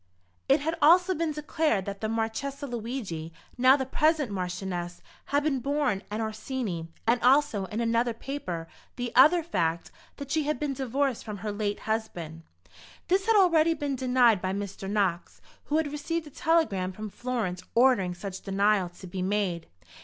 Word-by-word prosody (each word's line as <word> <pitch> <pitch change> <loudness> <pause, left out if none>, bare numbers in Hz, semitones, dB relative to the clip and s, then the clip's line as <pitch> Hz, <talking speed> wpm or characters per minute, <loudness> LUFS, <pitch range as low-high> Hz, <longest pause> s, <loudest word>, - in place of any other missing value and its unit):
It 275 +2 +5
had 320 +3 -1
also 355 +5 +6
been 330 -2 -1
declared 300 - 0
that 200 -1 -6
the 220 - -1
Marchesa 230 +6 -2
Luigi, 225 - -5 0.2
now 255 +2 +6
the 265 -2 -2
present 300 -2 +1
Marchioness, 180 -2 -4 0.2
had 285 +1 +1
been 285 -3 +1
born 275 -6 0
an 210 +2 -3
Orsini; 220 - -4 0.2
and 235 +1 +2
also, 260 -6 +3
in 210 +4 -5
another 235 +1 +1
paper, 185 -11 -5 0.3
the 245 -1 -3
other 315 +7 +7
fact 170 - -1
(?) - - -29
that 280 -1 -7
she 315 -2 +1
had 300 +1 -1
been 295 -2 -1
divorced 265 0 -1
from 210 -2 -6
her 210 - -1
late 205 0 -2
husband. 175 -8 -4 0.7
This 385 +3 +2
had 450 - +4
already 335 -4 +5
been 290 -2 -2
denied 250 -5 +3
by 185 0 -1
Mr. 195 -1 -5
Knox, 195 -4 -1 0.3
who 300 - 0
had 315 -3 0
received 315 +3 -3
a 295 - -11
telegram 265 - +1
from 215 +1 -7
Florence 225 -8 -3
ordering 230 -8 +4
such 190 +1 -7
denial 200 -1 +2
to 175 +2 -13
be 185 +1 -5
made. 185 -3 -1
235 Hz, 170 wpm, -28 LUFS, 195-290 Hz, 0.7 s, other